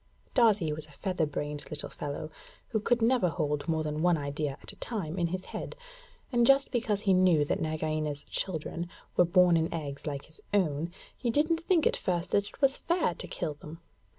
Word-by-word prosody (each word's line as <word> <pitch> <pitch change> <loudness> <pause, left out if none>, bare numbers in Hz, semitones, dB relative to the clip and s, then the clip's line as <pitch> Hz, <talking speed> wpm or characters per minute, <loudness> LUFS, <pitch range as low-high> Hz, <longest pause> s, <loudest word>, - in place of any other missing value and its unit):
Darzee 210 - +4
was 155 0 -7
a - - -17
feather 180 -5 0
brained 145 0 -4
little 150 -1 -3
fellow 145 +1 -5 0.4
who 220 - +1
could 235 +2 +1
never 230 -6 +4
hold 150 -3 -1
more 160 -1 +1
than 150 0 -2
one 175 -1 +4
idea 145 -1 -3
at - - -5
a - - -15
time 190 -7 -3
in 170 - +2
his 185 +2 -4
head; - - -6 0.6
and 240 -2 +4
just 275 0 +5
because 225 -5 0
he 195 -3 +3
knew 180 -5 +5
that - - -1
Nagaina's 155 -2 -1
children 170 -1 -3 0.3
were 180 - +6
born 180 0 +5
in 165 0 +1
eggs 145 -3 -5
like 140 -2 -3
his 420 - -14
own, 165 -4 +1 0.3
he 240 - -2
didn't 310 +7 +2
think 340 -2 +2
at - - +3
first 175 -1 -2
that 200 0 +2
it - - -14
was 270 0 +4
fair 340 - +1
to - - -8
kill 160 -4 -3
them. 155 +2 -11
170 Hz, 205 wpm, -30 LUFS, 150-210 Hz, 0.6 s, were